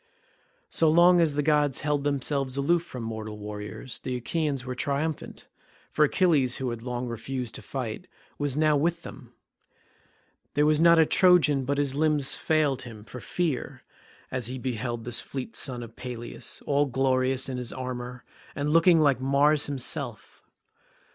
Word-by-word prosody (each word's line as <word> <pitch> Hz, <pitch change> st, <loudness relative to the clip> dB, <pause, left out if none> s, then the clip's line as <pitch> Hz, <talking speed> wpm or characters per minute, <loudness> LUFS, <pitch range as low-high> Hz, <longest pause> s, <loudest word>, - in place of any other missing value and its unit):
So 160 Hz, -, +3 dB
long 175 Hz, +2 st, +6 dB
as 155 Hz, -4 st, +2 dB
the 145 Hz, -, +1 dB
gods 150 Hz, -2 st, +2 dB
held 145 Hz, -1 st, 0 dB
themselves 140 Hz, -1 st, -1 dB
aloof 165 Hz, +5 st, +2 dB
from 125 Hz, -8 st, -8 dB
mortal 110 Hz, -1 st, -5 dB
warriors 105 Hz, +4 st, -6 dB
the 130 Hz, -, -4 dB
Achaeans 140 Hz, +1 st, -2 dB
were 130 Hz, -, -4 dB
triumphant, 145 Hz, +4 st, -3 dB, 0.5 s
for 150 Hz, -, +4 dB
Achilles 150 Hz, -6 st, +2 dB
who 130 Hz, -2 st, -2 dB
had 120 Hz, -1 st, -6 dB
long 125 Hz, 0 st, -4 dB
refused 120 Hz, +1 st, -4 dB
to -, -, -5 dB
fight 130 Hz, +5 st, -5 dB, 0.3 s
was 145 Hz, -1 st, -1 dB
now 155 Hz, -1 st, +3 dB
with 170 Hz, +3 st, 0 dB
them. 125 Hz, -3 st, -10 dB, 1.2 s
There 145 Hz, +1 st, +4 dB
was 155 Hz, 0 st, +3 dB
not 170 Hz, 0 st, +7 dB
a 160 Hz, -, +6 dB
Trojan 155 Hz, -7 st, +4 dB
but 140 Hz, +2 st, -1 dB
his 140 Hz, -2 st, +1 dB
limbs 150 Hz, -1 st, +2 dB
failed 150 Hz, -5 st, +1 dB
him 115 Hz, -4 st, -10 dB
for 120 Hz, +3 st, -9 dB
fear 155 Hz, 0 st, -3 dB, 0.5 s
as 125 Hz, -3 st, -1 dB
he 130 Hz, +1 st, -5 dB
beheld 120 Hz, -2 st, -3 dB
the 120 Hz, -, -6 dB
fleet 120 Hz, 0 st, -2 dB
son 125 Hz, -2 st, -1 dB
of 115 Hz, -1 st, -11 dB
Peleus 120 Hz, -2 st, -7 dB
all 145 Hz, 0 st, +2 dB
glorious 130 Hz, 0 st, +1 dB
in 130 Hz, -2 st, -4 dB
his 125 Hz, -2 st, -4 dB
armour, 125 Hz, -1 st, -6 dB, 0.3 s
and 145 Hz, +1 st, -1 dB
looking 165 Hz, 0 st, +5 dB
like 140 Hz, -4 st, +3 dB
Mars 145 Hz, +3 st, +3 dB
himself. 135 Hz, -3 st, -5 dB
135 Hz, 160 wpm, -27 LUFS, 125-150 Hz, 1.2 s, not